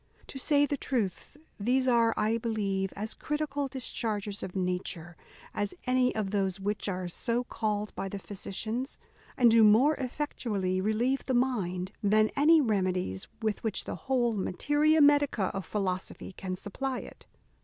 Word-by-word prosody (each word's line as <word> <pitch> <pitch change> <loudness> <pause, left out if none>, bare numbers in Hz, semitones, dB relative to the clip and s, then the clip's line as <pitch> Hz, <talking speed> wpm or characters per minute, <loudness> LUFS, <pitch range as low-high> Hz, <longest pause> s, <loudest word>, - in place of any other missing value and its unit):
To 270 - -6
say 290 +1 +3
the 285 0 -2
truth, 240 -1 -3 0.2
these 255 +5 +2
are, 235 -2 +4
I 220 +2 +1
believe, 200 -4 -1
as 215 +2 -3
critical 295 -2 -2
discharges 215 -6 -3
of 185 - -6
nature 180 -2 -3 0.4
as 205 -1 -2
any 255 0 +2
of 210 -3 -1
those 195 -2 0
which 205 +1 -2
are 185 -1 -3
so 230 +7 -1
called 215 -3 -2
by 195 - -4
the 200 - -5
physicians, 215 +6 -4 0.4
and 240 -3 +6
do 225 0 +6
more 225 +8 +6
effectually 225 -9 -2
relieve 235 +6 +1
the 260 - +1
mind 190 -8 0
than 215 +1 +3
any 315 +3 +6
remedies 185 - 0 0.2
with 215 -2 -1
which 220 -3 -1
the - - -5
whole 240 -3 +2
materia 295 - +2
medica 285 -9 +4
of 195 -3 -5
philosophy 190 -3 -3
can 185 0 -5
supply 255 +8 -4
it. - - -13
215 Hz, 155 wpm, -29 LUFS, 195-255 Hz, 0.4 s, and